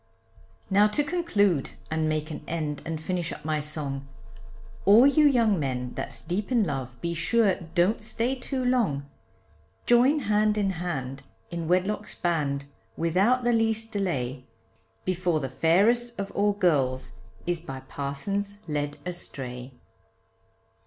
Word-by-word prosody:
Now 205 Hz, +2 st, +6 dB
to 215 Hz, +8 st, 0 dB
conclude 205 Hz, -, +1 dB, 0.2 s
and 160 Hz, 0 st, +1 dB
make 155 Hz, +1 st, -2 dB
an -, -, -6 dB
end 155 Hz, -3 st, -3 dB
and 165 Hz, -1 st, -3 dB
finish 175 Hz, +1 st, -2 dB
up 150 Hz, -, -8 dB
my 155 Hz, -1 st, 0 dB
song, 145 Hz, -2 st, -4 dB, 0.8 s
All 215 Hz, +6 st, +7 dB
you 295 Hz, +2 st, +6 dB
young 230 Hz, -, +3 dB
men 125 Hz, -3 st, -2 dB
that's 115 Hz, -1 st, -6 dB
deep 195 Hz, +7 st, -2 dB
in 235 Hz, -3 st, +4 dB
love, 130 Hz, -7 st, -4 dB
be 170 Hz, 0 st, -1 dB
sure 205 Hz, +4 st, +3 dB, 0.2 s
don't 185 Hz, +6 st, +3 dB
stay 230 Hz, +3 st, 0 dB
too 260 Hz, 0 st, -3 dB
long; 200 Hz, -, +1 dB, 0.8 s
Join 255 Hz, +5 st, +5 dB
hand 210 Hz, -1 st, +2 dB
in 200 Hz, -2 st, +1 dB
hand 135 Hz, -7 st, -4 dB, 0.3 s
in 170 Hz, -2 st, -3 dB
wedlock's 185 Hz, +4 st, 0 dB
band 145 Hz, -5 st, -1 dB, 0.3 s
without 195 Hz, +10 st, +2 dB
the 240 Hz, 0 st, +3 dB
least 225 Hz, 0 st, +1 dB
delay, 140 Hz, -, -2 dB, 0.6 s
Before 180 Hz, -3 st, +1 dB
the 135 Hz, -3 st, -3 dB
fairest 215 Hz, -, +2 dB
of 200 Hz, 0 st, -3 dB
all 205 Hz, +1 st, +2 dB
girls 140 Hz, -10 st, +1 dB, 0.3 s
is 175 Hz, -1 st, 0 dB
by 135 Hz, -5 st, -7 dB
parsons 195 Hz, +11 st, -4 dB
led 145 Hz, -1 st, -2 dB
astray. 130 Hz, -8 st, -6 dB
175 Hz, 140 wpm, -27 LUFS, 145-215 Hz, 0.8 s, All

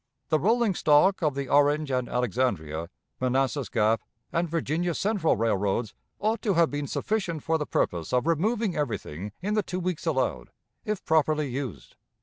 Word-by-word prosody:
The 155 Hz, -, +3 dB
rolling 225 Hz, -, +2 dB
stock 175 Hz, +5 st, +4 dB
of 150 Hz, -4 st, +1 dB
the 140 Hz, -1 st, -3 dB
Orange 145 Hz, +1 st, +3 dB
and 125 Hz, -1 st, -1 dB
Alexandria, 95 Hz, -10 st, -1 dB, 0.3 s
Manassas 130 Hz, 0 st, 0 dB
Gap, 110 Hz, +1 st, +2 dB, 0.3 s
and 170 Hz, 0 st, 0 dB
Virginia 165 Hz, +1 st, -1 dB
Central 200 Hz, -5 st, +1 dB
Railroads 105 Hz, 0 st, 0 dB, 0.2 s
ought 215 Hz, +1 st, 0 dB
to 200 Hz, -5 st, +1 dB
have 170 Hz, -1 st, +4 dB
been 145 Hz, 0 st, -3 dB
sufficient 185 Hz, -7 st, -2 dB
for 160 Hz, 0 st, +1 dB
the 150 Hz, -, -3 dB
purpose 85 Hz, -2 st, -1 dB
of 125 Hz, +2 st, +2 dB
removing 200 Hz, +5 st, +1 dB
everything 105 Hz, -, -3 dB
in 205 Hz, +2 st, 0 dB
the 215 Hz, -, +3 dB
two 185 Hz, -2 st, -4 dB
weeks 180 Hz, -2 st, -3 dB
allowed, 130 Hz, -, 0 dB, 0.4 s
if 210 Hz, -2 st, -3 dB
properly 155 Hz, -2 st, +2 dB
used." 130 Hz, -4 st, -6 dB
150 Hz, 160 wpm, -27 LUFS, 125-175 Hz, 0.4 s, stock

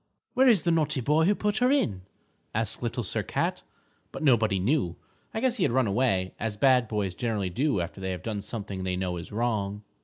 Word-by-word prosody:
"Where 265 Hz, +1 st, +4 dB
is 220 Hz, -8 st, +5 dB
the 170 Hz, -, +2 dB
naughty 150 Hz, -4 st, +1 dB
boy 150 Hz, +6 st, +3 dB
who 205 Hz, +3 st, +3 dB
put 210 Hz, +1 st, 0 dB
her 250 Hz, +1 st, +4 dB
in?" 110 Hz, -, +1 dB, 0.5 s
asked 110 Hz, 0 st, -1 dB
Little 120 Hz, 0 st, -2 dB
Sir 95 Hz, -, -1 dB
Cat. -, -, -2 dB, 0.5 s
But -, -, -6 dB
nobody 110 Hz, -8 st, +4 dB
knew. 95 Hz, -, +1 dB, 0.4 s
I 220 Hz, -, -3 dB
guess 255 Hz, -1 st, +1 dB
he 195 Hz, -, +1 dB
had -, -, +2 dB
run 130 Hz, +1 st, +3 dB
away, 100 Hz, -4 st, +1 dB
as 110 Hz, -1 st, -3 dB
bad 125 Hz, 0 st, +4 dB
boys 105 Hz, -4 st, -2 dB
generally 105 Hz, -3 st, -2 dB
do 135 Hz, -, +1 dB
after 90 Hz, +3 st, -5 dB
they 95 Hz, -, -2 dB
have 90 Hz, -1 st, -4 dB
done 105 Hz, -3 st, -3 dB
something 100 Hz, -3 st, -5 dB
they 90 Hz, 0 st, -1 dB
know 90 Hz, -1 st, -2 dB
is 85 Hz, -, -8 dB
wrong. 105 Hz, -2 st, -1 dB
110 Hz, 215 wpm, -27 LUFS, 95-145 Hz, 0.5 s, is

